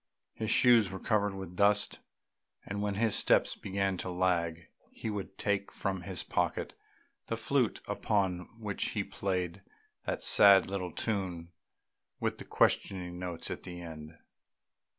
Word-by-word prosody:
His 110 - -4
shoes 115 -4 +5
were 95 - -6
covered 105 -2 +1
with 95 -2 -7
dust, 105 +1 +3 0.7
and 100 0 -4
when 105 -1 -1
his 110 0 +1
steps - - +3
began 95 -1 -1
to 90 - -4
lag 90 -2 0 0.2
he 110 - -5
would 100 -1 -6
take 100 -1 -1
from 95 -1 -3
his 90 0 -5
pocket - - -1 0.5
the - - -2
flute - - 0
upon 95 -4 -1
which 105 -3 -2
he 100 - +1
played 95 -2 -3 0.5
that - - -2
sad 100 -2 +8
little 95 -2 -4
tune 90 -5 -3 0.7
with - - -2
the - - -8
questioning 90 -2 0
notes 90 -2 -5
at - - -5
the 90 -1 -8
end. 80 -2 -9
95 Hz, 145 wpm, -31 LUFS, 90-100 Hz, 0.7 s, sad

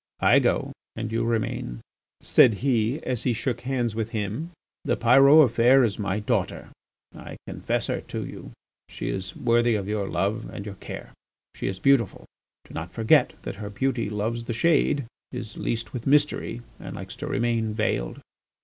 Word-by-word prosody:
"I - - +6
go - - +1 0.2
and 110 0 -4
you 115 +1 0
remain," 110 - -2 0.4
said 115 -4 +5
he, 125 +2 +1
as 125 -3 -2
he 125 - +1
shook 120 +3 -2
hands 125 -4 -1
with 110 0 -2
him. 110 - -3 0.3
"The - - 0
Pyrot 135 +5 +7
affair 125 +3 +5
is 110 -2 0
my 100 0 -1
daughter; 105 - -1 0.5
I - - -9
confide - - -2
her - - -2
to - - -5
you, - - -9 0.4
she - - -5
is 95 -1 -4
worthy 120 0 +2
of 100 -2 -3
your 105 -2 -1
love 100 +6 -1
and 100 - -7
your 105 - -6
care; 95 - -9 0.4
she - - -4
is 95 - -3
beautiful. 120 -1 +2 0.4
Do - - -14
not 80 +1 -5
forget 120 +5 +3
that - - -5
her 105 0 -6
beauty 120 +1 -1
loves 110 +3 -2
the 120 - -3
shade, 140 +1 +2 0.3
is 120 -4 -6
leased 115 0 -3
with 120 -1 -5
mystery, 145 -4 +1 0.2
and - - -7
likes 95 +4 -8
to 145 +4 -5
remain 115 -5 0
veiled. 85 - -1
115 Hz, 175 wpm, -25 LUFS, 105-125 Hz, 0.5 s, Pyrot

